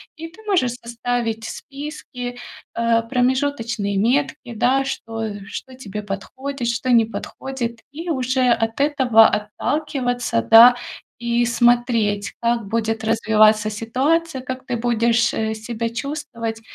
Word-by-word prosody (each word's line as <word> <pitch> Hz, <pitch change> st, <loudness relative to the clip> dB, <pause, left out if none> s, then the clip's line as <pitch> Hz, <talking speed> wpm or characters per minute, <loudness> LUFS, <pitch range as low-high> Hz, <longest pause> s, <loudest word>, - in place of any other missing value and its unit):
И 330 Hz, 0 st, -7 dB
ты 365 Hz, +6 st, -17 dB
можешь 300 Hz, -, +2 dB
составить 235 Hz, -1 st, -2 dB
списки, 265 Hz, -3 st, -7 dB, 0.4 s
а, 230 Hz, 0 st, +2 dB
промежуточные 245 Hz, -4 st, 0 dB
метки, 250 Hz, +2 st, 0 dB
да, 255 Hz, +5 st, +2 dB
что 225 Hz, -5 st, -5 dB
что 260 Hz, +5 st, -7 dB
тебе 210 Hz, -5 st, -7 dB
подходит, 245 Hz, +6 st, -5 dB
что 240 Hz, +2 st, -2 dB
не 235 Hz, -2 st, +6 dB
подходит, 235 Hz, +1 st, -5 dB
и 330 Hz, +4 st, -6 dB
уже 260 Hz, -2 st, +1 dB
от 225 Hz, 0 st, +1 dB
этого 265 Hz, -6 st, +5 dB
отталкиваться, 245 Hz, -, -1 dB
да, 230 Hz, -, +8 dB, 0.4 s
и 235 Hz, 0 st, +1 dB
смотреть, 235 Hz, -4 st, +2 dB
как 235 Hz, -1 st, 0 dB
будет 225 Hz, +1 st, -1 dB
развиваться 215 Hz, -1 st, +3 dB
ситуация, 265 Hz, +8 st, 0 dB
как 255 Hz, 0 st, -6 dB
ты 245 Hz, -2 st, -2 dB
будешь, 230 Hz, -1 st, +2 dB
э, 220 Hz, 0 st, -1 dB
себя 230 Hz, +1 st, -4 dB
чувствовать. 235 Hz, -3 st, -5 dB
235 Hz, 120 wpm, -21 LUFS, 225-260 Hz, 0.4 s, да